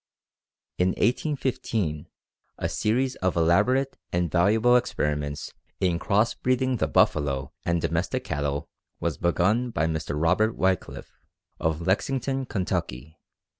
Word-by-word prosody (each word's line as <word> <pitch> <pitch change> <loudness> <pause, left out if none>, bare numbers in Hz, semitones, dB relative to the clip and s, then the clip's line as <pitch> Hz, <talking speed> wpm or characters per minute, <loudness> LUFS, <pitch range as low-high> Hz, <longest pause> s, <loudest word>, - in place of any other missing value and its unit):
In 90 - +4
1815 120 - -1 0.5
a - - -2
series 125 +4 0
of 95 -1 0
elaborate 105 +12 +2
and 85 -2 0
valuable 110 +7 +4
experiments 75 -11 -1 0.3
in 90 -2 +1
cross 105 +6 +2
breeding 130 0 0
the - - 0
buffalo 70 -3 +1
and 85 0 +1
domestic 85 +1 -1
cattle 70 0 -2 0.3
was - - -2
begun 105 +8 +2
by 80 -9 0
Mr. 80 -2 -2
Robert 90 +7 +2
Wickliffe, 95 0 -2 0.4
of 80 0 -1
Lexington, 135 +6 0
Ky. 80 - -3
90 Hz, 115 wpm, -26 LUFS, 80-120 Hz, 0.5 s, In